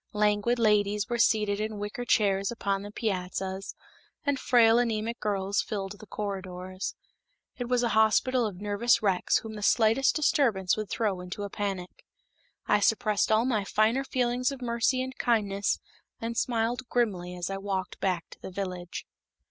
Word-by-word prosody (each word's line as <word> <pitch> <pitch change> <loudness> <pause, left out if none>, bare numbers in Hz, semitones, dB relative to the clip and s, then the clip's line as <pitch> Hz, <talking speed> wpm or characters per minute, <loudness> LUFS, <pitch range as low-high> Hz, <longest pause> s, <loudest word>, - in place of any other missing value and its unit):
Languid 210 +3 +2
ladies 210 -2 +2
were 240 0 -1
seated 210 -3 +3
in 215 0 -3
wicker 205 +4 -5
chairs 200 -4 +2
upon 200 -4 -1
the 205 - -7
piazzas, 190 -2 -3 0.5
and 285 -2 +1
frail 235 -2 +5
anemic 230 -1 -1
girls 200 -1 0
filled 200 -1 -5
the 215 - -12
corridors. 185 -2 -5 0.6
It 245 -1 -3
was 250 -1 +2
a 235 - +2
hospital 225 +3 +3
of 190 -4 -7
nervous 210 +4 +2
wrecks 190 -3 +2
whom 220 -1 -6
the 210 - -7
slightest 225 +5 +3
disturbance 235 - +2
would 215 -2 -4
throw 200 -5 -1
into 180 +3 -6
a 200 - -5
panic. 195 -3 -4 0.6
I 210 - +3
suppressed 210 0 +2
all 220 +2 +4
my 225 -6 +1
finer 220 +6 +2
feelings 250 0 0
of 275 - -7
mercy 245 +1 +1
and 260 0 -6
kindness 205 -4 +1 0.4
and 230 +1 -4
smiled 240 +1 -1
grimly 185 -7 0
as 180 +1 -4
I 195 - -2
walked 195 -2 -3
back 180 -3 -1
to - - -13
the - - -6
village. 180 -2 -5
210 Hz, 165 wpm, -28 LUFS, 195-235 Hz, 0.6 s, frail